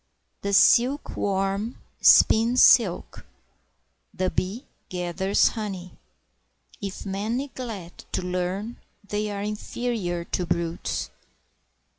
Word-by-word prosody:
The 200 - -2
silkworm 205 -3 +2 0.2
spins 230 +3 +6
silk, - - +4 0.9
the 185 0 -1
bee 205 +9 -3 0.2
gathers 180 +2 +1
honey; 195 -5 -6 0.9
If 200 0 -6
men 205 +4 -2
neglect 235 -10 -7
to - - -1
learn, 185 +5 -3 0.3
they 210 +1 -2
are 200 -1 -4
inferior 210 -4 -3
to 180 - -2
brutes. 170 0 -2
200 Hz, 90 wpm, -25 LUFS, 185-225 Hz, 0.9 s, spins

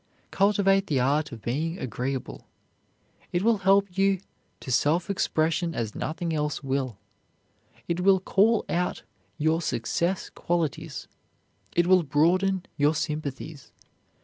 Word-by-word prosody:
Cultivate 195 -1 +3
the 140 -4 +1
art 145 +4 +1
of 115 -4 -9
being 160 +8 -2
agreeable. 130 - -4 0.8
It 175 +1 0
will 225 -1 +3
help 195 -1 +3
you 195 -1 +3 0.4
to 130 - -6
self 165 +9 +2
expression 165 -2 0
as 110 -2 -3
nothing 165 +1 -3
else 150 -1 -2
will; 130 -5 -2 0.9
it 170 +1 -1
will 190 +1 +4
call 210 +4 +2
out 180 +1 -1 0.3
your 160 +2 +1
success 170 +8 -1
qualities; 170 -4 -3 0.7
it 175 - +4
will 185 0 +5
broaden 180 +6 +2
your 145 +1 +3
sympathies. 150 -1 -4
165 Hz, 120 wpm, -26 LUFS, 145-190 Hz, 0.9 s, will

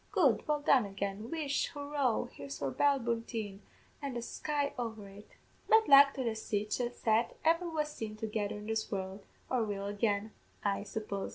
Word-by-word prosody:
Good! 275 - +3
Well 300 -1 +1
done 260 -7 +4
again 200 +2 -4
Whish! 295 -3 0
Hurroo! 285 -4 0
Here's 140 -1 -7
for 140 -2 -2
Ballyboulteen, 230 - 0 0.4
an' 275 -3 -4
the 235 - -3
sky 285 +3 -2
over 225 -4 -4
it!' 200 +2 -14 0.3
"Bad 445 0 +6
luck 280 0 +8
to 265 - -2
the 230 -2 0
sich 210 0 -2
a 240 -1 0
set 225 -1 +1
ever 335 +2 +3
was 305 -2 -1
seen 220 -6 -5
together 215 -1 -2
in 210 - -8
this 220 0 -2
world, 190 0 -4 0.2
or 250 -3 +1
will 200 -2 -3
again, 205 +1 0 0.3
I 200 -1 +1
suppose. 200 -1 -4
225 Hz, 175 wpm, -33 LUFS, 205-280 Hz, 0.4 s, luck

